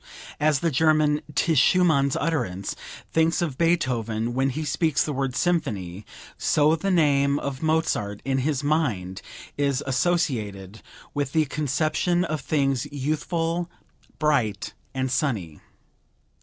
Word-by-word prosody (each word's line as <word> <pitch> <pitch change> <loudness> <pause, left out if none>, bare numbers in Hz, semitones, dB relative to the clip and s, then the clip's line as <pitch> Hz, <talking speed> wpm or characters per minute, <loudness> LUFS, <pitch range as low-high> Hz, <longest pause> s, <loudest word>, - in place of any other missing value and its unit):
As 150 -2 +2
the 165 - +1
German 150 +1 +3
('tis 160 -3 +3
Schumann's 140 -5 +3
utterance) 100 - -2 0.4
thinks 160 +1 +2
of 155 -7 -2
Beethoven 120 -9 0
when 135 +2 +1
he 155 +4 -3
speaks 150 +1 +1
the 150 - -3
word 135 -2 -2
symphony, 105 - -1 0.3
so 155 +2 +3
the 180 +5 -2
name 140 -5 +3
of 140 -2 -4
Mozart 155 -11 0
in 135 0 +1
his 140 0 -1
mind 120 - -1 0.4
is 140 -1 +1
associated 115 - -1 0.3
with 145 -2 -2
the 160 -1 +3
conception 155 +5 0
of 155 -3 -3
things 135 -1 0
youthful, 165 +4 -2 0.5
bright 140 -9 0 0.2
and 130 -1 -1
sunny. 115 - -1
145 Hz, 125 wpm, -25 LUFS, 125-160 Hz, 0.5 s, German